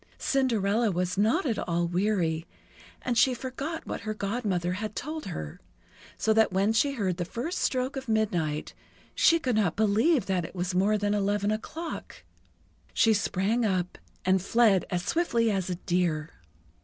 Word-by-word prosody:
Cinderella 230 -4 +1
was 180 -1 -1
not 225 - +2
at 230 -6 0
all 170 0 0
weary, 175 -3 0 0.6
and 245 - -1
she 250 +2 +4
forgot 275 +6 -5
what - - -5
her 215 +1 -4
Godmother 200 -5 -1
had 210 +3 -4
told 310 +3 -5
her; 75 - -6 0.6
so 220 - +2
that 220 -1 +4
when 195 +4 +2
she 280 +5 +2
heard 190 -8 -1
the 175 - -1
first 250 - -4
stroke 255 +1 0
of 270 -1 -5
midnight, 175 -9 0 0.4
she 335 - +5
could 255 -8 -1
not 205 -6 +1
believe 220 - +3
that 185 -3 0
it 165 - -8
was 180 0 -2
more 200 +4 +3
than 205 0 0
eleven 205 0 +1
o'clock. 320 +10 -6 0.7
She 225 - +5
sprang 205 +3 0
up, 185 -4 -1 0.3
and 190 0 +3
fled 205 -1 +3
as 180 -1 -2
swiftly 235 -4 +1
as 190 -2 -1
a 180 - -1
deer. 170 -4 -1
205 Hz, 165 wpm, -28 LUFS, 180-235 Hz, 0.7 s, she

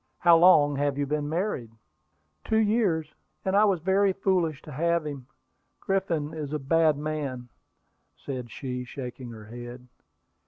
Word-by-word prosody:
"How 170 -1 +6
long 160 -4 +6
have 140 -1 0
you 145 - 0
been 145 +1 -2
married?" 165 - -2 0.7
"Two 220 - +1
years; 205 -8 +1 0.3
and 190 0 +1
I 210 +1 +6
was 190 -5 +1
very 190 +2 +3
foolish 180 -6 0
to 150 - -10
have 170 +3 0
him. 140 -4 -6 0.5
Griffin 170 -6 -1
is 155 -2 -5
a - - +1
bad 155 +1 +2
man," 145 -5 -4 0.7
said 125 -3 -6
she, 125 0 -5
shaking 125 -1 -7
her 110 -2 -10
head. 120 +2 -9
150 Hz, 150 wpm, -27 LUFS, 135-175 Hz, 0.7 s, How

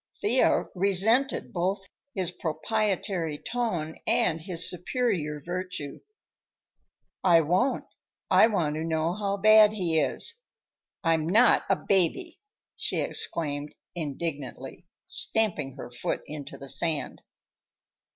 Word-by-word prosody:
Thea 415 - +2
resented 200 +8 +2
both 190 +2 -2 0.3
his 185 -3 -1
proprietary 180 -1 -2
tone 180 -8 -3
and 160 0 +2
his 170 0 -1
superior 180 - -2
virtue. 175 -2 -5 1.2
"I 170 -3 +6
won't. 180 - +1 0.5
I - - +7
want 165 -9 -1
to 160 - -3
know 165 +1 0
how 200 0 -2
bad 215 +1 +6
he 170 -6 +1
is. 460 - 0 0.6
I'm 165 -1 +1
not 225 +7 +5
a - - +4
baby!" 200 - 0 0.4
she - - -2
exclaimed 145 -3 -2 0.2
indignantly, 150 -1 -6 0.2
stamping 165 - 0
her 130 - -9
foot 120 - -3
into 150 -2 -8
the 140 - -10
sand. 155 -5 -1
175 Hz, 110 wpm, -27 LUFS, 155-205 Hz, 1.2 s, I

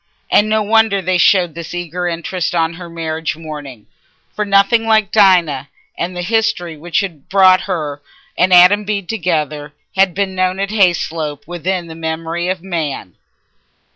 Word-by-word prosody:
And 210 +1 +4
no 215 0 +1
wonder 220 -1 +3
they 185 -1 0
showed 180 -4 +3
this 170 +1 -7
eager 175 0 -3
interest 175 +1 -3
on 165 0 +1
her 175 0 -10
marriage 160 -1 -4
morning, 145 -8 -9 0.5
for 210 - -1
nothing 200 +3 +3
like 220 -2 +2
Dinah 175 -9 +3 0.3
and 180 +1 -4
the 175 - -3
history 180 -5 -1
which 170 +6 -1
had 170 -8 -7
brought 185 -1 +5
her 150 -5 -3 0.3
and 180 +1 +2
Adam 180 +4 +6
Bede 200 -3 -3
together 155 -7 -2 0.2
had 190 -2 +2
been 195 -1 -1
known 185 0 0
at 195 0 -1
Hayslope 165 -7 0
within 175 +2 -3
the 165 - -9
memory 165 +1 -4
of 185 -1 -3
man. 155 - -4
175 Hz, 160 wpm, -16 LUFS, 160-195 Hz, 0.5 s, Adam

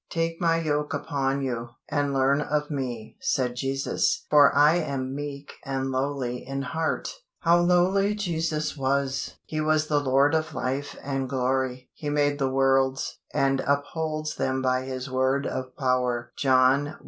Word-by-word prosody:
"Take 165 0 -2
My 165 -1 +3
yoke 150 -2 -1
upon 140 -2 -1
you, 120 -2 -4
and 145 -1 0
learn 135 +1 +2
of 150 0 -1
Me," 125 -6 -4
said 130 - 0
Jesus; 135 +1 0
"for 145 -1 +7
I 150 +4 +6
am 135 -5 -2
meek 145 0 -6
and 135 -1 -2
lowly 130 -2 -1
in 135 +1 -4
heart." 160 +4 -2 0.3
How 170 +1 +5
lowly 185 +4 +3
Jesus 160 -6 -2
was! 135 -1 -1
He 155 0 -3
was 155 0 +2
the 150 -1 +3
Lord 140 +2 +3
of 155 -1 -1
life 135 +3 -3
and 135 -1 -2
glory. 130 -1 -1
He 150 - -5
made 145 0 +1
the 135 -1 +1
worlds, 135 0 +1
and 135 -2 +1
upholds 155 +2 -1
them 130 0 0
by 130 0 +1
His 130 0 -5
word 130 +1 +1
of 130 -1 -4
power 125 -3 0
(John 130 +1 +3
i. 150 - -8
140 Hz, 160 wpm, -26 LUFS, 130-150 Hz, 0.3 s, for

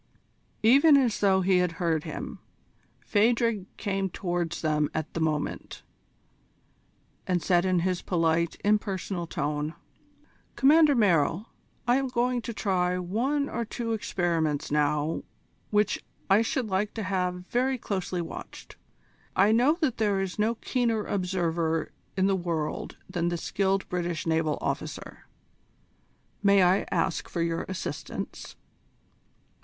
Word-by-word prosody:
Even 280 +6 +7
as 250 -6 +2
though 190 -2 +3
he 185 0 +3
had 180 -2 +1
heard 165 -1 -1
him, 155 - -6 0.6
Phadrig 225 -2 +2
came 195 -2 -1
towards 175 -2 -3
them 150 -1 +1
at 160 -1 -3
the - - -3
moment, 155 -2 -2 1.4
and 180 -1 +2
said 175 +2 +2
in 185 -2 +2
his 180 0 0
polite, 165 -1 0
impersonal 195 -4 0
tone: 150 +1 -2 0.8
"Commander 300 +1 +5
Merrill, 185 - +2 0.4
I 245 +1 +4
am 270 0 0
going 245 0 0
to 235 - -5
try 180 -4 0
one 245 +11 0
or 235 - -2
two 230 0 -3
experiments 170 -10 -1
now 150 +1 +1 0.5
which 210 -1 +1 0.3
I 200 +3 +6
should 245 +1 -1
like 205 +1 -1
to 220 - -3
have 180 -1 -2
very 260 +2 +1
closely 185 -5 -3
watched. - - -9 0.6
I 200 +3 +5
know 255 +8 +4
that 275 -7 +1
there 205 -3 +1
is 195 +1 -3
no 220 +3 +2
keener 230 -3 0
observer 170 -4 -1 0.3
in 190 - +3
the 195 0 +3
world 170 -4 -3
than 175 -2 -1
the 175 - -2
skilled 195 +2 0
British 175 -2 -2
naval 160 -2 +1
officer. - - -5 1.1
May 200 -2 +5
I 180 +2 +3
ask 165 - -1
for 170 - -1
your 165 0 -1
assistance?" 185 - -5
190 Hz, 130 wpm, -27 LUFS, 170-220 Hz, 1.4 s, Even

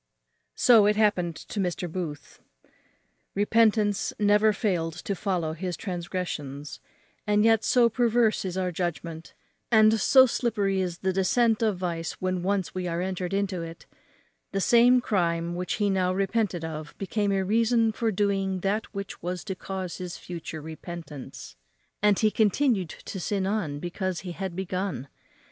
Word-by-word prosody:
So 225 -4 +6
it 210 - +3
happened 195 -6 +2
to 205 - -7
Mr. 180 -1 -1
Booth. 160 -4 -6 1.0
Repentance 210 0 +2
never 210 +1 +4
failed 180 -6 -1
to 200 - -4
follow 180 -4 -1
his 175 +2 -4
transgressions; 170 -7 -5 0.5
and 210 +1 +3
yet 225 -1 +4
so 245 -2 +4
perverse 235 -1 +2
is 185 -1 -4
our 185 -1 0
judgment, 165 -2 -4 0.3
and 220 -1 +5
so 260 +5 +7
slippery 205 -6 0
is 175 -2 -3
the 190 - +2
descent 220 +4 +2
of 215 -4 +1
vice 170 -2 -3
when 185 -1 -2
once 190 0 -1
we 185 0 -3
are 170 0 -2
entered 180 -1 -3
into 195 -2 -1
it, 165 0 -9 0.7
the 195 - 0
same 245 +4 +5
crime 170 -6 0
which 180 +1 -3
he 205 - 0
now 185 -2 +1
repented 195 -2 0
of 155 -2 -7
became 205 +1 -1
a 195 -1 +1
reason 230 +2 +3
for 225 +1 -1
doing 195 -2 0
that 205 +4 -1
which 200 0 -6
was 180 0 -4
to 195 - -4
cause 185 -1 -5
his 180 -1 -6
future 165 -3 -7
repentance; 155 - -9 0.5
and 205 -1 +4
he 215 -1 +3
continued 215 - +2
to 190 - -8
sin 195 +2 -1
on 190 -8 -1
because 180 +3 -3
he 180 - -6
had 190 0 -5
begun. 185 -7 -3
190 Hz, 155 wpm, -26 LUFS, 175-210 Hz, 1.0 s, so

